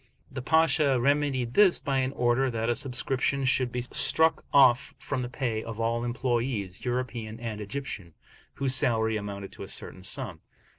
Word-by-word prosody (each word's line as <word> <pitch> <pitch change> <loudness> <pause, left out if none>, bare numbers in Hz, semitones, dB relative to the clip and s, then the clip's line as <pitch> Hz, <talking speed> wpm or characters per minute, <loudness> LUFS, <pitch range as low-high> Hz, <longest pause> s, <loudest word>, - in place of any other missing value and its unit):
The 130 -1 -5
Pasha 155 -2 +3
remedied 135 -2 +1
this 205 -4 +5
by 135 -3 0
an 130 0 0
order 125 +2 +2
that 115 0 -1
a - - 0
subscription 135 +1 0
should 130 -1 +2
be 125 - -2
struck 160 +5 +1
off 135 0 +5
from 135 -2 -3
the 120 - -4
pay 120 -4 -2
of 115 -1 -7
all 115 +1 0
employes, 120 -5 -2
European 120 -3 -3
and 110 -3 -5
Egyptian, 105 - -6 0.4
whose 135 -2 +1
salary 110 -4 +2
amounted 100 -2 -5
to - - -12
a - - -6
certain 95 - -4
sum. 95 - -2
125 Hz, 165 wpm, -28 LUFS, 115-135 Hz, 0.4 s, this